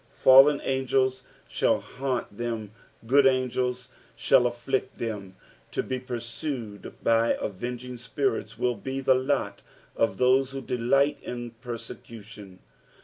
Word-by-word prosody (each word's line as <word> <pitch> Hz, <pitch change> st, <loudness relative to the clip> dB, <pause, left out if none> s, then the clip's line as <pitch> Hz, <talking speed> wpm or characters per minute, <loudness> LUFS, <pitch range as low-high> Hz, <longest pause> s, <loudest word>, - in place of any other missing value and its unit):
Pallcn 135 Hz, +2 st, +8 dB
angels 130 Hz, 0 st, +1 dB, 0.3 s
shall -, -, +1 dB
haunt 125 Hz, -5 st, -4 dB
them, 115 Hz, -2 st, -4 dB, 0.3 s
good 135 Hz, +3 st, +5 dB
angels 125 Hz, -1 st, 0 dB, 0.3 s
shall 125 Hz, -, +4 dB
afflict 120 Hz, +2 st, -2 dB
them. 100 Hz, -5 st, -5 dB, 0.4 s
To -, -, 0 dB
be 130 Hz, -1 st, -3 dB
pursued 120 Hz, -3 st, -6 dB
by 115 Hz, 0 st, +3 dB
avenging 125 Hz, +5 st, -5 dB
spirits 120 Hz, -2 st, -2 dB
will 125 Hz, +1 st, +1 dB
be 130 Hz, +5 st, -5 dB
tho 135 Hz, -1 st, +4 dB
lot 130 Hz, -6 st, -1 dB, 0.3 s
of 105 Hz, -4 st, +1 dB
those 130 Hz, +1 st, +3 dB
who 135 Hz, -, -4 dB
delight 130 Hz, +4 st, +1 dB
in 120 Hz, -1 st, -6 dB
persecution. 110 Hz, -4 st, -9 dB
125 Hz, 120 wpm, -27 LUFS, 115-130 Hz, 0.4 s, Pallcn